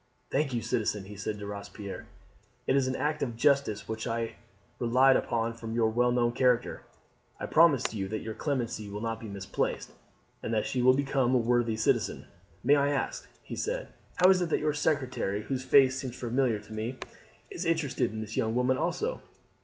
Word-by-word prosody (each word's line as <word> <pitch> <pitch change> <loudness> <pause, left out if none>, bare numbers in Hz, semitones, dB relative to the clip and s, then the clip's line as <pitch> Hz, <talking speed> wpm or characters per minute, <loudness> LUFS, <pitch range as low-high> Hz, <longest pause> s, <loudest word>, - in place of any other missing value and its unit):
"Thank 140 0 +1
you, 120 -2 -2
citizen," 105 -4 -1
he 105 +1 -10
said 105 +1 -4
to 105 - -7
Robespierre. 100 0 -7 0.6
"It - - +2
is 135 -2 +3
an 130 - -1
act 150 0 -1
of 120 -4 -2
justice 115 -4 +2
which 110 +1 -4
I 115 0 -2 0.5
relied 130 +3 +5
upon 115 -1 0
from 115 -1 -6
your 115 -1 +2
well 125 +2 +2
known 120 -1 +2
character. 125 -1 +1 0.6
I - - -3
promise 150 -8 +4
you 100 -3 -3
that 110 +3 -3
your 110 - -4
clemency 120 -6 -2
will 105 +1 -6
not 115 -1 -2
be 115 - -8
misplaced, 100 -1 -3 0.5
and - - -4
that 110 - +1
she 125 - -1
will 130 +1 +6
become 135 -2 +1
a - - +6
worthy 120 -1 +2
citizen. 110 - 0 0.4
May 140 +4 +5
I 140 0 +2
ask," 140 -2 -2
he - - -7
said, - - -3 0.3
"how 180 +1 +6
it - - +9
is 185 - +4
that 175 -3 0
your 150 0 0
secretary, 130 -9 -1
whose 130 +1 -3
face 130 -1 +5
seems 130 -3 -5
familiar 120 -1 +1
to 105 +1 -12
me, 110 +4 -4 0.5
is 385 - -4
interested 160 -8 0
in 110 0 -5
this 110 0 -6
young 110 +1 0
woman 125 +1 +2
also?" 440 - -1
120 Hz, 195 wpm, -29 LUFS, 110-135 Hz, 0.6 s, it